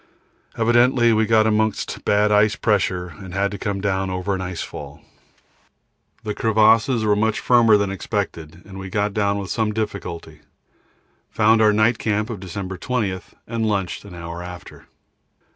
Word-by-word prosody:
Evidently 120 +1 +4
we 110 0 +2
got 110 -1 +4
amongst 110 -1 -1
bad 105 +1 +3
ice 105 +1 +4
pressure 90 -5 0
and 95 -1 -9
had 100 +1 0
to 100 - -6
come 100 0 -2
down 95 -1 -1
over 95 +2 -2
an 95 - -3
ice 90 -2 -4
fall. - - -9 1.2
The 105 -1 -3
crevasses 110 +2 +3
were 105 -1 +3
much 110 +1 0
firmer 115 -3 +5
than 100 -1 -1
expected 90 -5 -4
and 95 -1 -10
we 95 0 -7
got 105 +1 -1
down 100 -1 0
with 100 -2 -5
some 110 -2 0
difficulty, 100 -6 -5 0.9
found 110 +1 +3
our 105 -1 +5
night 110 +2 +2
camp 105 +1 -1
of 105 - -6
December 95 0 -6
20, 105 -7 -2 0.3
and 115 -1 -2
lunched 100 -5 -2
an 100 -3 -11
hour 85 0 -7
after. 90 -1 -10
105 Hz, 160 wpm, -21 LUFS, 95-110 Hz, 1.2 s, firmer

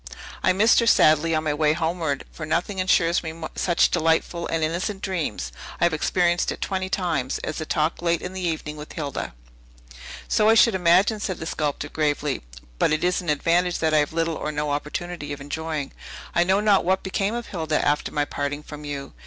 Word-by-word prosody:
"I - - +4
missed 210 +5 +5
her 235 - +1
sadly 160 -5 +5
on 155 - 0
my 150 -2 0
way 150 0 +2
homeward; 160 -3 -1
for 160 - -8
nothing 170 +5 -1
insures 175 -2 +3
me 160 0 -7 0.2
such 175 -2 +2
delightful 165 +1 +1
and 165 -1 -1
innocent 185 +5 -2
dreams 155 - -2 0.3
(I - - 0
have 170 -1 +3
experienced 175 +2 +1
it - - -6
twenty 190 -1 -2
times) 165 -10 -1
as 155 - -4
a 155 - -5
talk 155 +1 0
late 170 -1 +1
in 180 - -5
the 190 - -5
evening 155 -3 -3
with 150 0 -9
Hilda." 145 - -4 0.9
"So 215 0 +3
I 225 - +6
should 230 0 +6
imagine," 190 +4 +3
said 190 -3 -3
the 160 - -6
sculptor 145 -2 -2
gravely; 150 -2 -1 0.4
"but - - +3
it 155 - 0
is 180 +1 +1
an 175 - -5
advantage 170 +4 +2
that 160 -1 0
I 155 - +5
have 145 - 0
little 165 0 0
or 150 - -3
no 150 0 -2
opportunity 150 +1 -4
of 145 - -7
enjoying. 150 0 -4 0.4
I 175 - +3
know 190 +3 +3
not 210 -2 +4
what 190 +2 +1
became 195 +3 -1
of 240 -1 -5
Hilda 160 -5 -1
after 145 0 +1
my 145 -1 0
parting 145 +1 -3
from 150 0 -9
you. 145 -2 -6
165 Hz, 205 wpm, -24 LUFS, 150-180 Hz, 0.9 s, I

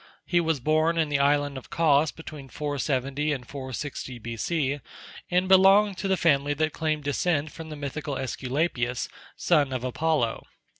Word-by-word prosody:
He 175 - +2
was 165 -3 0
born 155 +5 +2
in 160 -2 +1
the 140 -1 +1
island 145 -1 +2
of - - -18
Cos 155 -2 +3
between 150 -4 -10
470 145 0 -1
and 125 -4 -6
460 130 -1 -6
B.C., 130 +6 -2 0.5
and 180 +1 +2
belonged 195 +1 +6
to 195 - -2
the 190 -1 +2
family 145 -3 +2
that 155 +1 0
claimed 155 -2 -1
descent 145 +1 0
from 160 -1 -9
the 155 - -6
mythical 145 0 -4
Æsculapius, 130 -1 -1 0.3
son 150 -6 +2
of 130 -2 -3
Apollo. 130 -2 0
145 Hz, 155 wpm, -26 LUFS, 135-160 Hz, 0.5 s, belonged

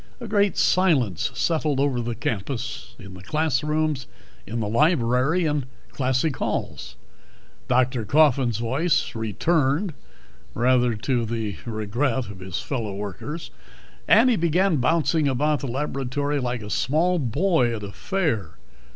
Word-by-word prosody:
A 235 - -7
great 205 -3 +2
silence 140 - +2
settled 155 -4 0
over 135 -3 +1
the 120 0 -3
campus, 115 +4 -4
in 100 -4 -11
the 95 - -11
classrooms, 150 - 0 0.4
in 115 +3 -3
the 110 - -1
library, 135 - +2
in 145 -4 -1 0.2
classic 130 +2 0
halls. - - -3 0.7
Dr. 125 -1 +2
Coffin's 130 -2 +3
voice 120 +3 0
returned 140 - 0 0.6
(rather 125 -1 +3
to 120 +3 -1
the 110 -3 -3
regret 115 +4 -1
of 95 - -11
his 95 -1 -4
fellow 115 -8 -3
workers) 105 - -6 0.6
and 245 +3 +6
he - - +3
began 170 0 +2
bouncing 155 +2 +2
about 145 +3 +1
the 140 - -4
laboratory 140 +2 -2
like 120 -3 -3
a 105 - -7
small 170 - +1
boy 135 - +1
at 105 - -7
a 100 - -6
fair. 145 - -2
130 Hz, 135 wpm, -24 LUFS, 115-155 Hz, 0.7 s, and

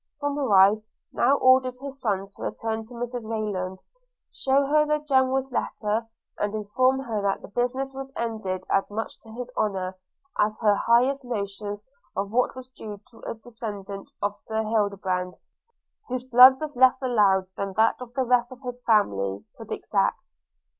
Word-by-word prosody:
Somerive 220 -9 +3 0.3
now 265 +4 +4
ordered 255 -1 +4
his 275 0 -8
son 195 -3 -1
to - - -15
return 225 -1 -3
to 245 - -12
Mrs 245 0 -4
Rayland, 210 -4 -3 0.6
shew 275 +1 +2
her 300 +2 +4
the 300 0 +1
General's 265 -2 +1
letter, 220 -2 -1 0.3
and 210 +1 -1
inform 255 +6 +1
her 225 -5 -2
that 200 -1 -1
the - - -8
business 250 +5 -2
was 270 0 -7
ended 215 -5 -3
as 195 - +1
much 220 +2 -5
to 225 - -16
his 250 +2 -7
honour, 190 -3 -1 0.4
as 215 +1 +2
her 210 -3 +4
highest 250 +6 +3
notions 205 -3 -4 0.3
of 200 +1 -2
what 250 +2 +1
was 255 0 -9
due 210 -5 -8
to 230 - -17
a - - -3
descendant 210 -4 -7
of 205 0 0
Sir 220 +1 -3
Hildebrand 200 -4 -1 0.7
(whose 250 0 -2
blood 260 +1 +8
was 305 -2 -5
less 260 +1 +5
allowed 205 -6 +3
than 195 -1 -3
that 225 +4 +2
of 245 -2 -8
the 265 - +2
rest 245 0 +2
of 255 0 -11
his 245 0 -6
family) 100 - +1
could - - -11
exact. - - -1
225 Hz, 165 wpm, -25 LUFS, 205-255 Hz, 0.7 s, blood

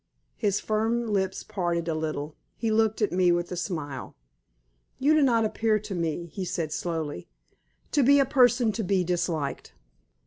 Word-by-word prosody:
His 205 -3 0
firm 225 +2 0
lips 190 -3 -1
parted 175 -5 -2
a 165 - 0
little. 155 -1 -3 0.2
He 225 -2 -1
looked 220 0 +2
at 210 - +1
me 180 -1 +3
with 175 +1 0
a - - -2
smile. 155 -7 -5 0.8
"You 290 +4 +3
do 310 - +4
not 235 -5 +3
appear 220 0 +1
to 210 -1 -6
me," 170 -1 -2
he 195 - -4
said, 165 -3 -3
slowly, 160 - -3 0.6
"to 290 - +3
be 280 +2 +6
a 275 - +4
person 250 -3 +4
to 220 +1 -3
be 190 -1 +1
disliked." 170 -5 -2
190 Hz, 170 wpm, -27 LUFS, 170-225 Hz, 0.8 s, be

